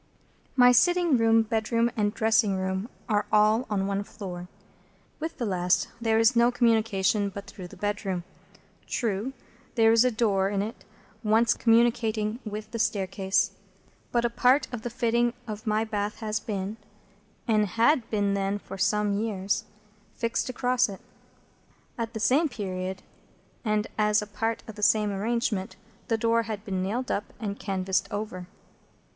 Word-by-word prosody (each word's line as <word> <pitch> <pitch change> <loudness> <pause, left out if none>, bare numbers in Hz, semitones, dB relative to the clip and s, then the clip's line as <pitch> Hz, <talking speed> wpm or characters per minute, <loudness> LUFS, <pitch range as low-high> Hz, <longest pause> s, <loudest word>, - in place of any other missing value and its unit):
My 250 -1 +7
sitting 345 +4 +4
room, 225 -1 +4
bedroom, 230 +2 0
and 205 -2 +1
dressing 220 -2 +2
room, 190 +3 -2 0.2
are 210 -3 +1
all 215 +3 +4
on 195 -2 0
one 200 0 -1
floor. 180 -4 -8 0.7
With 320 +2 -5
the 240 - -2
last 180 -3 +1
there 225 -1 +2
is 225 +3 +4
no 235 +1 +5
communication 220 -4 +2
but 200 +1 -8
through 190 -2 -9
the - - -14
bedroom. 205 -3 -2 0.6
True, 220 +2 -1 0.4
there 225 -1 +5
is 230 +1 +6
a 255 - +3
door 205 -5 +1
in 200 -1 0
it, 220 +3 -7 0.4
once 225 +2 +4
communicating 225 -1 +2
with 215 0 -6
the 230 - -4
staircase; 195 -2 +1 0.6
but 240 0 +1
a - - +2
part 255 +4 +3
of 240 - -4
the 240 - -4
fitting 235 0 +1
of 215 +1 -7
my 215 +1 +2
bath 210 -1 -2
has 215 -1 -2
been—and 210 +1 -4
had 235 - +3
then 205 -2 +1
been 200 0 0
for 195 -1 -9
some 210 -1 +1
years—fixed 210 +2 -3
across 250 -1 +1
it. 195 - -8 0.9
At 230 -1 -4
the - - -2
same 290 +8 +3
period, 190 -5 -4 0.6
and 215 -2 +1
as 210 0 +4
a 210 - -3
part 225 +2 -3
of 220 - -7
the 210 - -10
same 210 0 +3
arrangement,—the 205 0 -2
door 230 +1 +2
had 220 -2 -6
been 190 -2 -2
nailed 235 +7 -2
up 205 - -2
and 205 -2 -4
canvased 190 -1 -1
over. 205 -4 -5
215 Hz, 150 wpm, -27 LUFS, 200-230 Hz, 0.9 s, My